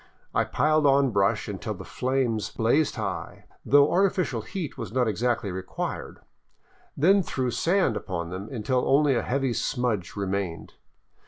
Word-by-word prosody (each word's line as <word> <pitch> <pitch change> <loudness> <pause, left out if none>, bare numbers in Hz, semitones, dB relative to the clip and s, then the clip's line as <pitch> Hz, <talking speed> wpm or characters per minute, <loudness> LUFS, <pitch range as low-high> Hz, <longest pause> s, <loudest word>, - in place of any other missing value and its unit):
I - - +2
piled 155 -1 +2
on 135 -1 +4
brush 100 -2 +1
until - - -4
the - - -9
flames 125 -4 -1
blazed 135 +7 +1
high, - - -5 0.2
though 145 +1 +5
artificial 180 - +1
heat 155 - -5
was - - -6
not 125 0 +1
exactly 115 -1 0
required, 95 +1 -5 0.8
then 195 +7 +5
threw 130 -7 -2
sand 165 - +1
upon 85 -5 -4
them 95 +3 -6
until 125 +1 0
only 145 0 +4
a 120 - +1
heavy 135 -1 -1
smudge 115 -8 -1
remained. 100 -4 -3
125 Hz, 145 wpm, -26 LUFS, 105-145 Hz, 0.8 s, though